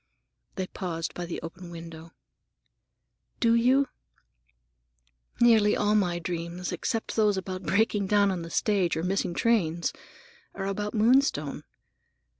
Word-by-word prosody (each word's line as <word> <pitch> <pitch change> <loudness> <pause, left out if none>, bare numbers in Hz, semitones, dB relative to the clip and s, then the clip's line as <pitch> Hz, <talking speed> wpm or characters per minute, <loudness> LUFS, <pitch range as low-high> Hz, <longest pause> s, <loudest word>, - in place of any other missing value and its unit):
They 190 - -2
paused 170 -3 -4
by 175 -1 -5
the 170 - -4
open 175 +2 -8
window. 165 -1 -10 1.3
"Do 230 -1 +4
you? 255 +4 +4 1.5
Nearly 220 -3 +5
all 210 0 +2
my 180 -5 +2
dreams, 175 +1 -4
except 225 -3 -3
those 210 -3 +3
about 185 -1 -4
breaking 205 0 +1
down 205 0 +3
on 180 -2 -3
the 165 - -7
stage 190 -2 +1
or 160 - -2
missing 180 -1 -1
trains, 175 -8 +1 0.6
are 195 - -4
about 205 +2 -3
Moonstone. 215 - +2
190 Hz, 125 wpm, -27 LUFS, 170-215 Hz, 1.5 s, Nearly